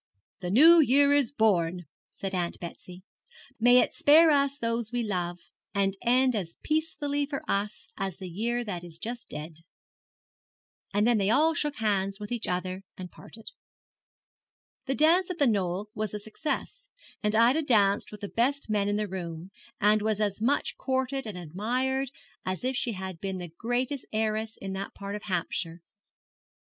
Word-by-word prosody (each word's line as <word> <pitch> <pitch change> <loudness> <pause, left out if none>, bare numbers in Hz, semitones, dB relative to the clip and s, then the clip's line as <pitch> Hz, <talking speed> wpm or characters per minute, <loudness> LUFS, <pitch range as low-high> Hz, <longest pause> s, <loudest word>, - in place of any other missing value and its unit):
'The 180 -2 -4
New 320 - +8
Year 285 0 +5
is 285 -5 +3
born,' 180 - +1 0.3
said 195 -1 -5
Aunt 175 -2 -2
Betsy; 180 +1 -9 0.6
'may 245 +2 +6
it - - -1
spare 315 +2 +6
us 280 -1 +2
those 230 -2 -2
we 245 -1 -1
love, 175 -4 -2 0.4
and 195 -1 +1
end 255 +1 +3
as 175 -5 -4
peacefully 295 -2 -1
for 275 -2 -4
us 205 +2 -2
as 195 -3 -3
the 190 - -7
year 235 +7 -2
that 180 -6 -5
is 170 -2 -10
just 235 +6 -6
dead.' 155 +1 -7 1.3
And 205 +1 +2
then 235 -2 +3
they 195 0 +1
all 310 +8 +4
shook 295 -2 -1
hands 195 -4 0
with 210 +1 -7
each 240 -3 -1
other 185 +1 -2 0.2
and 180 -1 -8
parted. 225 0 -11 1.4
The 270 - 0
dance 340 +6 +4
at 365 - -4
The 285 - +3
Knoll 200 -3 0
was 215 -1 -3
a - - -3
success, 310 - -4 0.3
and 210 0 0
Ida 240 +7 +5
danced 205 -8 +3
with 210 - -10
the 205 - -4
best 255 +3 0
men 205 -1 +1
in 205 - 0
the 210 0 -1
room, 175 -1 -6 0.3
and 210 +1 +4
was 215 -1 0
as 210 -1 -1
much 270 +6 +1
courted 265 -1 -1
and 205 -4 -5
admired 245 - -1 0.3
as 185 +3 -3
if 260 +1 0
she 240 -1 -1
had 190 -3 -6
been 190 -1 -3
the 175 -1 -6
greatest 245 +6 -2
heiress 220 0 -1
in 195 0 -5
that 195 +1 -5
part 200 0 -6
of 210 - -5
Hampshire. 170 -2 -3
215 Hz, 175 wpm, -28 LUFS, 190-260 Hz, 1.4 s, New